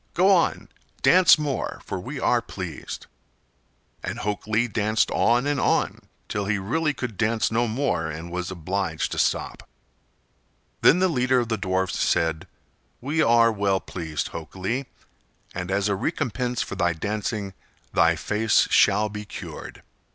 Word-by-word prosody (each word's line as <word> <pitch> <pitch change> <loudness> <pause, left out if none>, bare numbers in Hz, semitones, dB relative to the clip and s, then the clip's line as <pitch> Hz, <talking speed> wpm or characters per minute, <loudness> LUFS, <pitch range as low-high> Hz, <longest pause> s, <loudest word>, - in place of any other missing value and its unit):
Go 190 +3 +5
on—dance 180 0 +3
more, 145 -3 -3
for - - -4
we - - -6
are - - +2
pleased." - - -7 1.0
And - - -4
Hok 105 0 -3
Lee 110 +3 +2
danced 110 0 +1
on 120 +3 +2
and 145 -1 0
on, - - +1 0.3
till 100 -1 -2
he 105 +1 0
really 150 +11 0
could 125 -7 -5
dance 110 0 +1
no 120 +2 +1
more 110 - -1
and 80 +3 -7
was 90 0 -3
obliged 90 -1 -2
to - - -2
stop. - - -1 1.1
Then 165 - +6
the 185 +1 +3
leader 130 -5 +2
of 120 - -4
the 110 - +1
dwarfs 95 -2 -1
said: 80 -1 +1 0.5
"We 150 +5 0
are 115 -2 +5
well 100 -2 +1
pleased, 80 -6 -4
Hok 80 +1 -8
Lee, 115 +9 -2 0.7
and 90 0 -4
as 100 +1 +1
a 100 - +1
recompense 125 - -1
for - - -7
thy 85 -3 +1
dancing 105 +2 -3 0.4
thy - - +4
face 110 +1 +2
shall 105 +2 +4
he 105 0 -6
cured. 105 - -9
105 Hz, 150 wpm, -24 LUFS, 95-125 Hz, 1.1 s, Then